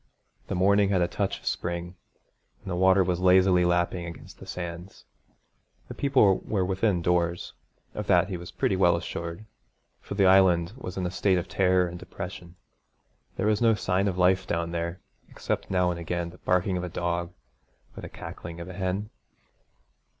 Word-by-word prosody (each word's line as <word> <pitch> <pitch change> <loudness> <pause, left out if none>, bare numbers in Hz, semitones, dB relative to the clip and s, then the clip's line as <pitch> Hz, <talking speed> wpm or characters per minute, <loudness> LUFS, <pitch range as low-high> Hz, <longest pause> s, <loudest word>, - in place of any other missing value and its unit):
The 100 - -3
morning 100 +2 +3
had 95 -3 +2
a - - +1
touch - - -2
of - - -21
spring, 85 0 -3 0.7
and 95 - -6
the - - -1
water 95 +1 +4
was 90 -1 -1
lazily 90 0 +5
lapping 85 0 0
against 85 - -11
the - - -11
sands. 85 +1 -7 0.8
The - - -5
people 130 -9 +3
were 95 -4 -1
within 95 -1 0
doors, 85 0 0 0.4
of 105 -1 -5
that 90 -3 +4
he 95 - -4
was 85 -1 -8
pretty - - 0
well - - +4
assured 85 +5 -5 0.5
for - - -7
the 100 -1 +3
Island 95 -1 +4
was 95 -9 -8
in 95 - -1
a 90 - -2
state 95 0 +2
of 85 - -3
terror 90 -1 +2
and 85 0 -8
depression. 90 -1 -8 0.8
There - - -2
was 105 0 +2
no 115 -2 +4
sign 95 0 0
of 95 -2 -2
life 95 +1 +3
down 85 0 -2
there 85 +1 -4 0.3
except - - -4
now 90 -2 +2
and 85 - -5
again 85 0 -3
the 90 - -16
barking 90 +1 +1
of 90 - -3
a 90 - -4
dog 85 0 -2 0.6
or - - -8
the - - -8
cackling 85 0 -9
of 85 - -7
a 95 - -8
hen. 95 +3 -3
90 Hz, 185 wpm, -27 LUFS, 85-95 Hz, 0.8 s, lazily